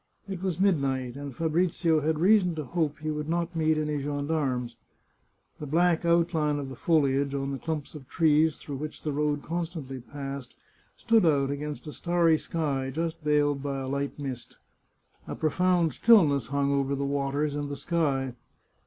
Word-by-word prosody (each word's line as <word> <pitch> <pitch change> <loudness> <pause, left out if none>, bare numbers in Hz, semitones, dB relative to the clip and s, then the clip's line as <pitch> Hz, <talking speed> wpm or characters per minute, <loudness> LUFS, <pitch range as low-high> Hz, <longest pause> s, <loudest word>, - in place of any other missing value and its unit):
It 190 -3 -5
was 185 -3 -2
midnight, 135 -10 +1
and 140 -2 -7
Fabrizio 165 0 +1
had 155 +1 0
reason 180 0 +4
to 155 - -3
hope 150 +1 -1
he 155 0 -3
would 150 0 -4
not 170 +1 -1
meet 160 -1 +2
any 150 -1 -1
gendarmes. 140 -4 -2 0.8
The 150 - -6
black 170 +3 +2
outline 165 -3 +2
of 140 -2 -4
the 135 - -8
foliage 140 -2 +1
on 135 0 -2
the 135 - -4
clumps 155 -3 -4
of 145 -4 -10
trees 160 -2 +3
through 140 -2 -7
which 150 +2 -7
the 150 - -1
road 145 0 0
constantly 160 -5 -4
passed 135 0 -7 0.4
stood 230 -3 +3
out 140 -4 +3
against 145 +2 -5
a 150 - -7
starry 170 -2 +2
sky, 140 -5 -2
just 165 +3 -3
veiled 145 -2 +2
by 140 -1 -3
a 130 - -4
light 140 +1 -2
mist. 135 -4 -6 0.7
A - - -4
profound 175 +1 +2
stillness 155 - +5
hung 140 +1 0
over 140 0 0
the 140 0 -2
waters 140 +1 -1
and 145 0 -3
the 145 - -5
sky. 140 -7 0
150 Hz, 170 wpm, -27 LUFS, 140-165 Hz, 0.8 s, stillness